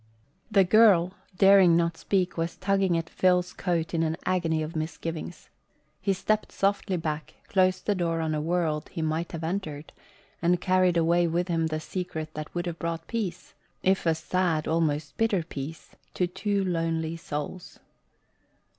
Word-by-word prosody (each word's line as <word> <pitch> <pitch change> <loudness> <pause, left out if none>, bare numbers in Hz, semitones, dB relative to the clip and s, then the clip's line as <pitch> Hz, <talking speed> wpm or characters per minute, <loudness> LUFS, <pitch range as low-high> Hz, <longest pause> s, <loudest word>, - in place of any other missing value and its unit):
The 200 -3 +5
girl, 185 -3 +5 0.2
daring 195 -3 +7
not 170 -1 +1
speak, 185 +1 0
was 165 0 -2
tugging 195 -2 +1
at 165 0 -3
Phil's 180 +1 +2
coat 170 -2 -1
in 165 - +1
an 160 0 0
agony 165 -4 +1
of 155 +2 -6
misgivings. 160 +1 -5 0.5
He 195 +1 +1
stepped 215 +3 0
softly 195 -1 0
back, 155 -2 -4
closed 185 -1 +2
the 205 - +2
door 170 -3 -1
on 160 -1 -1
a 150 - -1
world 160 -2 -1
he 165 - -4
might 160 +2 -1
have 165 -1 -6
entered, 160 -4 -4 0.5
and 175 +1 +3
carried 185 -1 +3
away 170 +1 +3
with 175 +2 -1
him 165 -1 +1
the 155 0 -2
secret 160 -2 -5
that 155 0 -6
would 175 0 -1
have 170 -1 -4
brought 165 0 -3
peace 200 -7 -4 0.3
if 190 -2 +2
a 165 - +3
sad, 170 -1 0
almost 155 -2 0
bitter 215 -6 +2
peace 155 0 -7 0.2
to 180 - +2
two 200 +3 -1
lonely 165 -2 -1
souls. 155 +2 -6
170 Hz, 165 wpm, -27 LUFS, 160-185 Hz, 0.5 s, daring